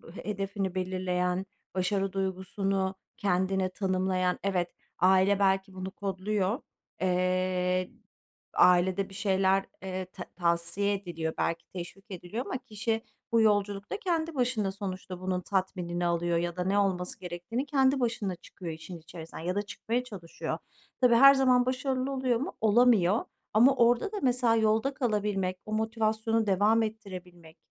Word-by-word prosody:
he - - -8
hedefini 195 -2 -2
belirleyen, 185 0 -1 0.3
başarı 195 +1 0
duygusunu 190 0 -1 0.2
kendine 190 0 +1
tanımlayan. 185 -1 0
Evet, 180 -3 0 0.3
aile 190 +2 +4
belki 195 0 +2
bunu 185 0 -5
kodluyor, 200 - -1 0.4
eee, 185 0 +1 0.6
ailede 185 +2 +4
bir - - -13
şeyler, 195 -1 +2 0.2
eee, 185 -1 -4
ta 185 - -6
tavsiye 170 +3 +1
ediliyor, 170 -5 -3
belki 165 0 -1
teşvik 185 +2 -8
ediliyor 185 +7 -5
ama - - -3
kişi 225 -2 -2 0.3
bu 230 -1 +4
yolculukta 205 - +1
kendi 330 -4 -1
başına 240 -6 +1
sonuçta 190 -2 -6
bunun 185 0 -1
tatminini 180 -2 -1
alıyor 170 0 +1
ya 175 0 -2
da 180 - -1
ne 195 +2 +1
olması 185 -3 -1
gerektiğini 180 +9 -4
kendi 270 -2 +3
başına 225 -6 -1
çıkıyor 175 0 -8
işin 160 +2 -9
içerisinden 165 0 -10
ya 180 +2 -1
da 205 - +1
çıkmaya 230 +4 -3
çalışıyor. 195 -9 -5 0.4
Tabii 245 -2 +6
her 275 +3 +9
zaman 255 -2 +4
başarılı 260 +1 -1
oluyor 260 -3 +1
mu? 275 - -5
Olamıyor 220 -2 +4 0.3
ama 250 +6 +6
orada 240 - +3
da 415 - -3
mesela 245 -3 +3
yolda 220 +5 +2
kalabilmek, 205 -7 -1
o 215 - -8
motivasyonu 220 0 0
devam 210 +4 +4
ettirebilmek, 180 -6 -8
195 Hz, 140 wpm, -29 LUFS, 185-225 Hz, 0.6 s, her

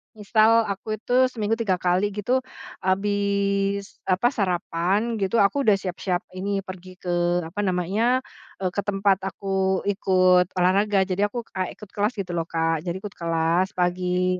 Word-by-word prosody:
misal 220 +2 +4
aku 215 +2 -4
itu 230 +3 -5
seminggu 225 -2 -2
3 200 -5 +1
kali 180 +3 +1
gitu, 245 +6 +1 0.4
habis 200 0 0
apa, 190 +6 +3
sarapan 195 +2 0
gitu 195 +3 -1
aku 240 +6 +1
udah 210 - +6
siap-siap 185 -1 -3
ini 195 +1 -3
pergi 185 -1 -10
ke 175 -1 0
apa 165 +6 -7
namanya, 210 +9 +1 0.4
eee, 180 - 0
ke 200 - -3
tempat 195 -1 +2
aku 190 0 -1
ikut 185 -2 +3
olahraga, 195 +2 +3
jadi 195 +2 0
aku 240 +2 -5
kayak 185 -1 -2
ikut 210 - -12
kelas 210 +4 +1
gitu 190 -3 -4
loh 165 -1 -2
Kak, 165 -1 0
jadi 170 - -1
ikut 210 - -5
kelas 165 +2 0
pagi. 180 0 0
195 Hz, 155 wpm, -24 LUFS, 180-205 Hz, 0.4 s, udah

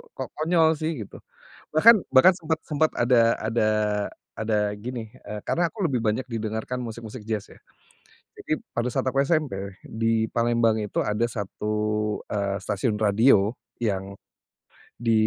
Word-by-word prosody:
kok - - -5
konyol 160 0 +4
sih 160 +1 -1
gitu. 100 - -12 0.5
Bahkan 220 +10 +8 0.2
bahkan 135 +8 +7
sempet 160 -2 -2
sempet 155 +1 +1
ada 120 -1 +4
ada 110 0 0 0.7
ada 105 -1 0
gini, 115 +1 -6
eee, 105 0 -7
karena 170 -1 +1
aku 200 -6 -1
lebih 125 -5 -1
banyak 110 +4 0
didengarkan 115 +2 -3
musik-musik 115 0 -7
jazz 105 -2 -3
ya. - - -17 0.8
Jadi - - -1 0.2
pada 120 +1 0
saat 130 - -1
aku 135 +2 +2
SMP 100 - -1
di 115 0 0
Palembang 115 -1 +3
itu 105 - -2
ada 105 +2 0
1, 105 0 -3 0.5
eee, 100 -1 -1
stasiun 105 +3 -1
radio, 105 0 +4 0.3
yang, 100 -3 -2 0.8
di 115 -1 -1
115 Hz, 140 wpm, -25 LUFS, 105-130 Hz, 0.8 s, Bahkan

